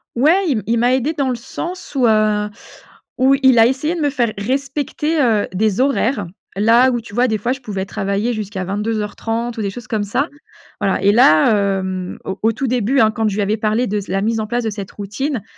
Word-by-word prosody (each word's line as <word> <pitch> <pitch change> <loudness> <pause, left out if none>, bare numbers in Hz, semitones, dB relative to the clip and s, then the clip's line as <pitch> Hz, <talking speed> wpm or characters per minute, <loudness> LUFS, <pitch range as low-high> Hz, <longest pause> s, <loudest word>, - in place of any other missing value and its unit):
Ouais, 320 +11 +3
il 240 - 0
il 235 +1 +1
m'a 245 +2 +3
aidée 265 +5 -1
dans 280 -4 -1
le 250 - 0
sens 340 +10 -7
où, 255 -3 +3
heu, 215 -1 +2 0.7
où 265 +2 +4
il 260 -3 +6
a 225 - +7
essayé 280 +6 -1
de 335 - -3
me 290 - +2
faire 240 -6 0
respecter, 280 +7 -1
heu, 225 -5 +2
des 205 +2 0
horaires. 260 -6 +1 0.3
Là 230 +5 +5
où, 240 -1 -1
tu 220 - -13
vois 245 +2 +3
des 220 -2 0
fois 235 +5 -2
je 270 - -8
pouvais 200 -6 -4
travailler 200 +4 -2
jusqu'à 205 -3 -4
22:30 225 +3 -3
ou - - -2
des 200 - -1
choses 240 +4 -9
comme 220 -4 -1
ça. 255 +9 -1 0.5
Voilà 195 - +1
et 200 - +5
là, 205 -4 +5 0.3
hem, 185 -1 -4
au 190 +1 -5
au 225 - +3
tout 270 - -3
début, 250 +2 +1
hein, 220 -2 +5
quand 225 0 -1
je 200 - -4
lui 210 - 0
avais 210 +2 0
parlé 220 +3 0
de 210 - -1
s 205 - -5
la 195 +1 -1
mise 225 +2 0
en 215 - -3
place 240 +2 -1
de 225 - -1
cette 200 -2 -6
routine 220 +5 -4
225 Hz, 230 wpm, -18 LUFS, 205-260 Hz, 0.7 s, a